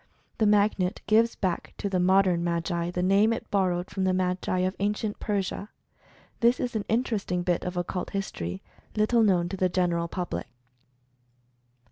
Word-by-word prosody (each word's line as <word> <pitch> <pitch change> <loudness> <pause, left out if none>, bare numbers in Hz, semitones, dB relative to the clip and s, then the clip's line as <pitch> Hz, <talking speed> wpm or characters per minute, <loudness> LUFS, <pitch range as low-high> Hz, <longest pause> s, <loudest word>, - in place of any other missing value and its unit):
The 215 - +4
Magnet 205 -3 +2
gives 225 +2 +3
back 185 -4 -3
to - - -2
the 190 -2 0
modern 185 -1 +3
Magi 170 0 -1
the 180 0 -2
name 200 +4 +4
it 230 - -4
borrowed 185 -3 0
from 190 - -2
the 185 0 +2
Magi 185 0 0
of 185 +1 0
Ancient 210 +1 -1
Persia. 200 0 -2 0.7
This 235 +2 +3
is 245 -2 -3
an 210 - -1
interesting 215 -6 0
bit 175 -1 0
of 180 0 -4
Occult 175 +1 -3
History 95 - -4 0.3
little 220 +2 +3
known 185 -5 +3
to 195 - -4
the 185 0 +2
general 175 -2 0
public. 175 -5 -4
185 Hz, 160 wpm, -27 LUFS, 180-210 Hz, 0.7 s, The